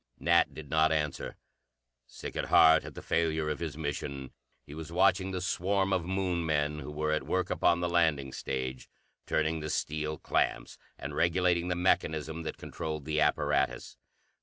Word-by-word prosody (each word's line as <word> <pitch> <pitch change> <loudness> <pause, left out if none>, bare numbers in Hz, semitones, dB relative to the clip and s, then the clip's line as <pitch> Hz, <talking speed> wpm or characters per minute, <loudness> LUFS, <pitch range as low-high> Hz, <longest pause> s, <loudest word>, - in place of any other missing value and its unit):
Nat 85 0 +3
did 80 -2 -8
not 80 0 +4
answer. 75 -2 -2 0.7
Sick - - -8
at - - -1
heart 80 0 +6
at - - -9
the - - -8
failure 80 -2 0
of 75 - -4
his 80 -3 -4
mission, 70 -3 -4 0.3
he 70 - -11
was 80 +1 -7
watching 95 +1 +3
the 95 -1 -3
swarm 95 +2 0
of 90 -3 0
Moon 95 -2 0
men 75 -1 0
who 75 +1 -7
were 75 +1 -1
at 75 - -1
work 95 -1 0
upon 85 0 +2
the 90 - +1
landing 80 -6 +1
stage, 65 -1 -4 0.4
turning 80 +1 +1
the 75 0 -5
steel 75 0 -2
clamps - - -1 0.2
and - - -6
regulating 85 0 +2
the 90 - 0
mechanism 80 -3 0
that 80 - -5
controlled 75 -3 -5
the 75 0 0
apparatus. - - +1
80 Hz, 170 wpm, -30 LUFS, 75-85 Hz, 0.7 s, heart